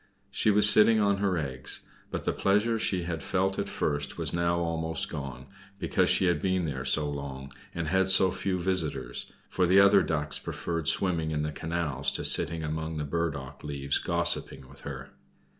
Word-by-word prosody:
She - - +1
was 105 0 +8
sitting 110 +1 +7
on 100 -1 +2
her 100 -2 0
eggs; 65 -4 -3 0.3
but - - -5
the - - -1
pleasure 105 +4 +1
she 95 -4 0
had 85 -2 -4
felt 95 +1 -1
at - - -3
first 75 -2 -2
was - - -1
now 85 0 0
almost 80 -1 -2
gone, 70 -5 -7 0.3
because - - 0
she - - +2
had 90 -1 +1
been 95 -2 0
there 65 -4 -4
so 75 +3 +2
long, 70 -1 -7 0.2
and 85 -2 -3
had 95 +2 +1
so 95 -1 +5
few 95 0 -2
visitors, 85 -9 -3 0.2
for 90 -1 0
the 95 +3 +5
other 100 0 +6
Ducks 75 -3 -2
preferred 85 -3 -4
swimming 80 -3 +1
on 75 - -1
the 75 - -3
canals 75 -4 -2
to - - -2
sitting 80 -1 +3
among 80 +1 -4
the 75 - -3
burdock 75 -3 -4
leaves 70 -2 -2
gossiping 65 - -1
with 70 +1 -16
her. - - -8
85 Hz, 185 wpm, -27 LUFS, 75-95 Hz, 0.3 s, was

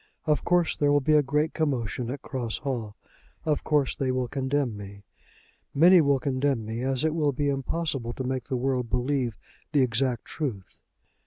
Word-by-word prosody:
Of 150 -2 +1
course 175 -2 +2
there 145 -1 +2
will 145 - +5
be 150 +3 +2
a 150 - +6
great 150 +3 0
commotion 125 -5 -1
at 135 +2 -5
Cross 125 -5 -3
Hall. 115 -6 -3 0.5
Of 150 -2 0
course 145 -3 +1
they 135 - -1
will 130 -1 -1
condemn 135 -2 -1
me. 100 0 -10 0.7
Many 175 +4 +7
will 140 -2 +3
condemn 130 -3 0
me, 110 +2 -4
as 130 +1 0
it 160 -1 +2
will 150 -3 +1
be 145 +2 0
impossible 135 -2 -2
to 130 - -4
make 130 -1 -2
the 130 - -2
world 125 -1 -1
believe 125 -3 0 0.4
the 145 - +4
exact 125 0 0
truth." 120 - -5
135 Hz, 180 wpm, -27 LUFS, 125-145 Hz, 0.7 s, Many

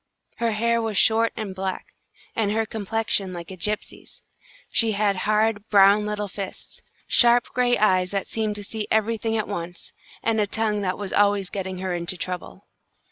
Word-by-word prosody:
Her 230 -1 0
hair 235 +2 +1
was 220 -3 -2
short 225 +2 +4
and 215 -4 -4
black, 190 0 -5 0.4
and 215 -3 +1
her 220 +1 +1
complexion 215 -2 -2
like 170 +1 -8
a - - -7
gypsy's. 210 +4 -4 0.5
She 225 -2 +3
had 200 -1 +1
hard, 215 +2 0
brown 205 +1 +5
little 210 0 -2
fists, 195 0 -8 0.3
sharp 240 0 +5
gray 245 -1 +2
eyes 185 -3 +3
that 195 0 -2
seemed 215 -2 -2
to 205 - -3
see 215 +1 -4
everything 225 +1 +1
at 215 - -2
once, 175 -3 -6 0.3
and 225 -1 +2
a 205 - +1
tongue 215 0 0
that 185 -2 -1
was 200 -2 -5
always 200 -2 +2
getting 190 -2 -4
her 185 0 -3
into 175 +1 -2
trouble. 180 - -6
210 Hz, 175 wpm, -24 LUFS, 190-220 Hz, 0.5 s, brown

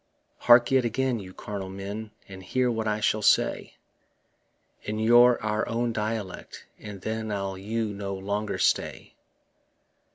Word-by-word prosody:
Hark 120 +1 +6
yet 130 -1 +4
again, 125 +1 -1
you 95 -2 -9
carnal 95 0 -6
men, 100 +3 -6 0.2
And 95 -1 -10
hear 125 +7 0
what 110 -1 -2
I 105 0 -1
shall 110 0 +1
say 105 - +2 1.1
In 105 +1 -4
your 120 +2 +5 0.3
own 115 0 -1
dialect, 105 -3 -5
and 105 -3 -9
then 110 +1 -3
I'll 100 -1 -3
you 105 +2 -3
no 100 -1 -5
longer 100 +2 -3
stay. - - -1
110 Hz, 135 wpm, -26 LUFS, 100-115 Hz, 1.1 s, Hark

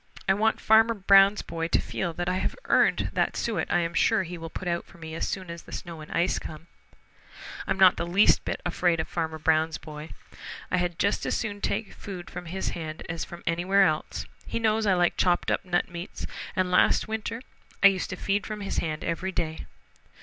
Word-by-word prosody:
I 190 - +5
want 220 +3 +1
Farmer 225 +1 +5
Brown's 195 0 +5
boy 165 0 -3
to - - +2
feel 175 - -3
that 175 +1 -3
I 180 +1 +1
have - - -2
earned - - +3
that - - 0
suet 210 -9 -1
I 175 - +3
am 170 0 -2
sure 220 +4 +3
he 175 0 -6
will 165 -1 -7
put 180 - -6
out 170 0 0
for 195 - -17
me 160 -1 -8
as 165 - -2
soon 185 -3 -4
as 170 0 -7
the - - -15
snow 170 -2 -7
and 155 - -11
ice 175 +2 +1
come. 155 +1 -9 1.0
I'm 195 - 0
not 185 -1 +6
the 170 - -2
least 195 +5 +4
bit - - -3
afraid 175 -1 +1
of 160 - -1
Farmer 160 -2 -3
Brown's 160 0 +2
boy. 150 0 -9 0.6
I - - +2
had 175 -2 -1
just 200 - +1
as - - 0
soon 205 -3 -4
take 225 - -2
food 185 -3 -8
from 175 -1 -7
his 190 +3 -3
hand 160 -2 -6
as 165 0 -3
from 175 - -10
anywhere 180 +4 +3
else. 155 -4 -1 0.2
He - - -2
knows 220 -1 +1
I 190 - +4
like 175 -1 +2
chopped 175 -1 +2
up - - 0
nut 175 -1 0
meats, 175 0 -7 0.3
and 185 -1 0
last 180 - +4
winter 220 +1 -3 0.4
I - - +8
used 190 -2 -2
to - - -4
feed 200 +1 -1
from 215 -1 -5
his 195 - -2
hand 155 -2 -3
every 170 +3 -2
day." 160 -3 -3
175 Hz, 220 wpm, -27 LUFS, 165-195 Hz, 1.0 s, I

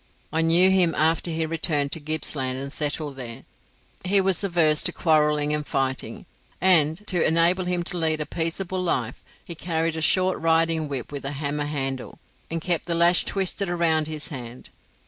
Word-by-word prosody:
I 160 - +2
knew 170 +3 +4
him 180 -3 +3
after 160 +2 +1
he 160 0 -1
returned 155 -3 -1
to - - -2
Gippsland 145 -4 -2
and 140 +1 -5
settled 150 -2 -3
there. 120 -3 -7 0.6
He 195 +2 +3
was 190 0 +1
averse 165 -5 +3
to 175 - +2
quarrelling 150 -3 +1
and 150 0 -1
fighting; 135 -2 -3 0.3
and, 170 0 +3
to 180 -5 0
enable 170 +3 +2
him 180 -1 -1
to 180 0 +1
lead 160 -1 0
a 150 - -2
peaceable 175 +4 -3
life, 130 -9 -2 0.2
he 170 - -6
carried 165 -1 -2
a 160 - -4
short 185 +3 +2
riding 165 -1 +2
whip 135 -3 -5
with 140 -1 -6
a 135 +1 -4
hammer 145 +1 -2
handle, 135 -3 -4 0.3
and 165 - -2
kept 175 0 -1
the 170 - -1
lash 170 +1 +4
twisted 195 0 -1
round 165 -3 +1
his 155 0 -4
hand. 125 -4 -9
160 Hz, 180 wpm, -24 LUFS, 145-175 Hz, 0.6 s, knew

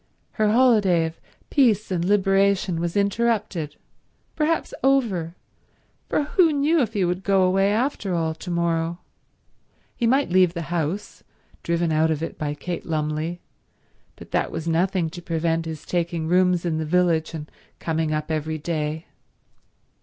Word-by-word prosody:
Her 215 -2 +1
holiday 210 -9 +4
of 160 0 -7 0.3
peace 225 -7 +3
and 175 -2 0
liberation 195 -2 +2
was 170 +2 -2
interrupted—perhaps 220 - -2
over, 215 -12 +1 0.7
for - - +1
who 330 +2 +3
knew 300 +2 +2
if 225 -3 -1
he 200 -4 +1
would 180 +2 -2
go 195 -1 +3
away, 195 +2 +3
after 215 -5 -1
all, 160 -1 0
to 165 +3 -9
morrow? 170 -1 0 1.0
He 235 - 0
might 270 -2 +2
leave 185 -1 +4
the 170 0 -4
house, 175 +4 -3 0.4
driven 170 -1 0
out 155 +1 +3
of 160 0 -1
it - - -6
by 150 -1 -2
Kate 175 +3 -5
Lumley, 155 +2 -2 0.7
but - - -13
that - - 0
was 165 0 -5
nothing 170 0 +1
to 175 - -8
prevent 165 -1 -1
his 160 -2 -7
taking 170 -2 -2
rooms 180 0 +3
in 160 -2 0
the 160 - -2
village 170 -1 +1
and 150 -1 -6 0.3
coming 160 -1 -1
up 155 +1 -2
every 155 0 -2
day. 155 0 -3
175 Hz, 150 wpm, -23 LUFS, 160-200 Hz, 1.0 s, holiday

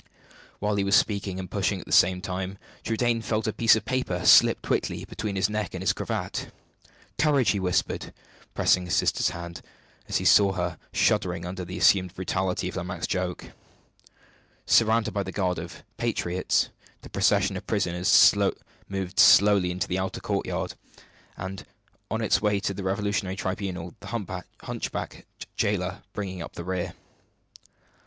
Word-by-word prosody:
While 105 0 -1
he 100 - +1
was 100 0 +3
speaking 100 -3 +1
and 95 - -5
pushing - - 0
at - - -10
the - - -11
same 90 +1 +4
time, 95 +1 -4 0.3
Trudaine 115 +1 0
felt 110 0 -1
a 110 - -1
piece 115 -1 +5
of 110 -2 -3
paper 110 -8 -2
slip - - +6
quickly - - -1
between 105 -2 -5
his 95 0 +2
neck 105 0 -3
and - - -5
his - - +3
cravat. - - -4 0.7
"Courage!" 145 -5 +3
he 100 - -1
whispered, 90 -2 -1 0.4
pressing 90 -1 +3
his 85 - 0
sister's - - +2
hand, 85 0 -7 0.5
as - - +1
he - - -3
saw 100 -2 +6
her 90 -2 -3
shuddering 90 -5 +1
under 90 +1 -5
the 90 +1 -6
assumed 95 -2 +3
brutality 95 0 -1
of 95 - -5
Lomaque's 90 -1 -4
joke. 90 -1 -3 1.1
Surrounded 115 0 +3
by 100 - 0
the 95 -1 -5
guard 90 -3 -1
of - - -9
"Patriots," 90 +1 0 0.3
the - - -10
procession 100 -1 +2
of 95 - -7
prisoners 90 -4 +4 0.6
moved 95 -2 -4
slowly 100 -2 +6
into 90 +1 -2
the 90 +1 -1
outer 95 0 -3
courtyard, - - -2 0.6
on 95 +1 -7 0.5
its 110 - +2
way 105 -1 +2
to 100 0 -2
the 100 - -6
revolutionary 95 -1 -1
tribunal, 95 -3 -4
the - - -11
humpbacked 95 -5 -6 0.3
jailer 95 -2 -1
bringing 95 -3 -5
up - - -8
the 85 - -7
rear. 90 0 -3
95 Hz, 155 wpm, -26 LUFS, 90-105 Hz, 1.1 s, slip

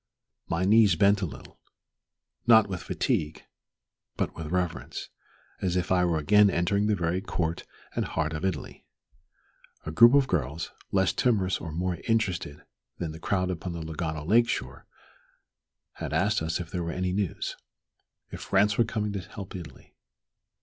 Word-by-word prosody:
My 85 +2 0
knees 105 -2 +5
bent 100 +4 +4
a 90 - 0
little, - - -12 0.9
not 110 -2 +7
with 95 -3 -4
fatigue, 75 +1 -2 0.7
but - - -2
with 80 -2 -6
reverence, 90 -2 -3 0.5
as 90 -2 0
if 90 0 -1
I 90 -1 +4
were 85 -2 +1
again 105 +7 +5
entering 100 +4 +1
the 105 - +2
very 90 0 -1
court 85 -4 -2 0.3
and - - +1
heart 80 0 -2
of 75 +3 -4
Italy. 95 -5 -3 1.0
A 80 - -3
group 120 - +7
of 140 -2 +4
girls, 80 - -2 0.2
less 95 -2 +2
timorous 95 -5 +1
or 80 - -5
more 90 +1 -2
interested 95 -10 -1 0.3
than 80 -3 -3
the 80 - -9
crowd 90 +1 0
upon 90 0 -5
the 85 -1 -5
Lugano 80 -1 -4
Lake 115 +4 +4
shore, - - -4 1.1
asked 95 +8 0
us 80 +1 -1
if 85 -2 -7
there 90 -2 -2
were 85 - -3
any 90 +1 -1
news 100 -3 -2 0.8
if - - -7
France 105 +3 +2
were - - +7
coming 105 -1 -2
to 100 - -2
help 100 +1 -9
Italy. 90 -3 -10
90 Hz, 160 wpm, -27 LUFS, 80-100 Hz, 1.1 s, not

